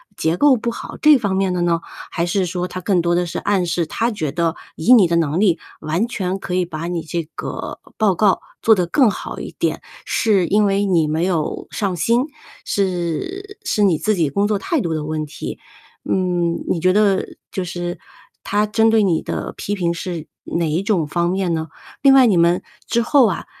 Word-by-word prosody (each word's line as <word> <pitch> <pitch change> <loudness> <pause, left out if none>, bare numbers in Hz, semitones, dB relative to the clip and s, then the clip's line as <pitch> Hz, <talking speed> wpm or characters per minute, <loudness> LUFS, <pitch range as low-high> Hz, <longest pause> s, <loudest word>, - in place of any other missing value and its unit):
结 160 +2 0
构 285 -3 +5
不 235 +1 -2
好， - - -8
这 305 -2 +7
方 200 -5 -1
面 190 -1 +1
的 180 - -1
呢？ 170 -1 +1 0.3
还 170 - -1
是 185 +2 0
说 180 +1 -3
他 185 - -5
更 185 -1 +1
多 170 0 +1
的 175 0 +1
是 170 - -5
暗 195 -3 +1
示 170 -1 0
他 230 +8 -1
觉 160 - -3
得 170 -1 0 0.2
以 170 +11 +5
你 210 -7 +7
的 170 - +2
能 160 +1 +1
力 180 -6 +3 0.2
完 165 +9 0
全 190 -5 -3
可 180 - -5
以 180 0 +2
把 165 -1 -5
你 175 -1 -2
这 170 +2 -3
个 - - -5 0.2
报 210 -4 +3
告 195 +1 +3 0.2
做 225 - +6
得 180 -3 0
更 235 - +4
好 - - -6
一 - - -7
点， - - 0 0.2
是 200 -7 +2
因 210 +1 +3
为 200 0 +2
你 170 -5 +3
没 155 +3 0
有 170 -5 -2
上 195 -4 -2
心， 235 - +2 0.4
是 200 - -2
是 210 - +1
你 185 -5 +4
自 215 +5 0
己 165 -5 +1
工 200 +8 +1
作 210 -1 +1
态 320 - -1
度 170 -8 -1
的 155 -1 -2
问 155 0 -3
题。 145 0 -7 0.5
嗯， 175 -2 0
你 170 - +1
觉 185 +2 +3
得， 200 -2 +2 0.2
就 190 - -2
是 175 0 -4 0.4
他 205 +1 +1
针 220 +1 +3
对 220 -1 +4
你 175 -5 +2
的 - - -4
批 205 - -3
评 170 -3 0
是 170 -2 -5 0.2
哪 170 -1 -1
一 160 +5 0
种 195 -6 +1
方 170 +3 0
面 185 -1 0
呢？ 160 -1 -2 0.3
另 275 -1 +6
外， 265 -1 +7
你 205 -6 +3
们 170 +1 +3 0.2
之 235 - +1
后 250 0 +4
啊 185 - -3
180 Hz, 230 characters per minute, -20 LUFS, 170-210 Hz, 0.5 s, 这